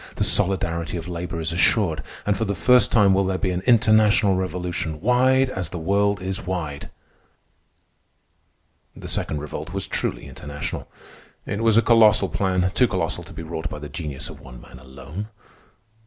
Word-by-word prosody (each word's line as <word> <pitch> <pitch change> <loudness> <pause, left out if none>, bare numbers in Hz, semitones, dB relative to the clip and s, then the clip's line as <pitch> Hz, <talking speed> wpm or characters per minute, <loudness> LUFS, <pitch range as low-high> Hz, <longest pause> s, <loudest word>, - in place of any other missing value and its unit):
The - - 0
solidarity 85 -3 +2
of 85 - -7
labor 85 -1 -5
is 80 0 -2
assured, 85 0 +2 0.2
and 105 - +1
for 100 - -1
the 100 -2 -2
first 125 +9 +4
time 100 -4 +5
will 95 +1 +2
there 95 0 -1
be 95 0 -1
an 90 0 -2
international 110 -4 +4
revolution 90 -4 -3
wide 130 - +3
as 90 -7 -4
the 90 - -6
world 100 +4 +1
is 95 +1 -3
wide. 80 -6 -5 2.1
The - - -9
Second 75 -2 -1
Revolt 75 - -7
was - - -1
truly - - -3
international. 75 0 -6 0.6
It 100 - -3
was 115 -1 +3
a 115 - +5
colossal 110 -4 +5
plan—too 95 +5 +1
colossal 90 -6 -2
to - - -12
be 80 - -7
wrought 80 0 -5
by - - -7
the 75 0 -8
genius 75 -3 -5
of - - -11
one 60 -2 -12
man 65 - -14
alone. 70 +10 -8
90 Hz, 170 wpm, -23 LUFS, 80-105 Hz, 2.1 s, time